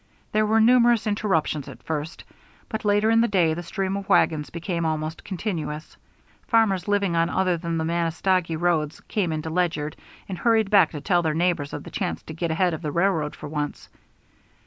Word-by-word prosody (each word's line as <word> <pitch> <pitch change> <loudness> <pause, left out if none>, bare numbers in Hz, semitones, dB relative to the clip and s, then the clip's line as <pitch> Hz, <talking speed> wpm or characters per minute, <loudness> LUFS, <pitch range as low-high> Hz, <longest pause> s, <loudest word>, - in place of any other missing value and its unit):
There 215 0 +2
were 220 +1 +3
numerous 235 0 +5
interruptions 190 -9 0
at - - -11
first, 155 0 -4 0.5
but 220 - -4
later 205 +1 +3
in 225 0 +5
the 235 - +3
day 175 -6 +2
the 170 - -4
stream 190 +3 -3
of 200 0 -6
wagons 155 -6 +3
became 170 0 -3
almost 155 0 -2
continuous. 165 -6 -4 0.5
Farmers 215 -5 +2
living 200 -4 +1
on 165 0 +2
other 185 -1 +1
than 165 0 -3
the 160 - -1
Manistogee 170 0 0
roads 165 -3 0
came 190 -6 -2
into 155 0 -3
Ledyard 160 -4 -1 0.3
and 185 -3 -5
hurried 220 -3 +2
back 195 -6 +6
to 150 - -5
tell 175 +2 +2
their 160 -2 -1
neighbors 165 -4 0
of - - -6
the - - -10
chance 185 -3 -3
to 160 - -8
get 170 +1 -2
ahead 175 +2 +1
of 160 - -5
the 150 -3 -3
railroad 170 -3 0
for - - -8
once. 150 -1 -4
175 Hz, 190 wpm, -24 LUFS, 160-200 Hz, 0.5 s, back